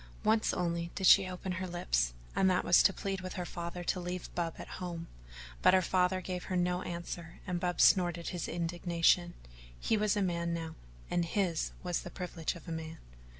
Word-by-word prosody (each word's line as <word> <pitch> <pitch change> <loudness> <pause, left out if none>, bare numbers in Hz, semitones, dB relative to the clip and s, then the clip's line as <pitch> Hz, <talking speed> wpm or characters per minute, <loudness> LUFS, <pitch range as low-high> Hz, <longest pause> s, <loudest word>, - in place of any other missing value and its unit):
Once 220 0 +3
only 170 -1 -1
did 190 - -1
she 195 +1 +8
open 185 +1 -5
her 185 +1 -3
lips - - 0 0.2
and 190 - +4
that 185 0 +1
was 175 - +7
to 195 - +5
plead 195 0 -3
with 185 0 -5
her 180 - -4
father 170 +1 -5
to 180 - 0
leave 180 0 -5
Bub 170 -2 -2
at - - -8
home, 170 -2 -4 0.6
but - - +6
her 185 - +5
father 185 +1 +2
gave 180 -1 -4
her 185 - -3
no 180 0 +1
answer 170 -1 -6
and 180 -1 -2
Bub 180 0 -2
snorted 175 -3 +4
his 175 -3 -3
indignation 175 0 +1 0.4
he 225 - +1
was 210 0 +1
a 205 - +2
man 170 -2 -1
now, 165 -1 -5 0.4
and 175 - +2
his 170 -2 0
now - - -19
was 180 -1 -1
the - - -7
privilege 175 -3 -4
of 170 - -12
a - - -5
man. 160 0 -5
175 Hz, 205 wpm, -32 LUFS, 170-185 Hz, 0.6 s, she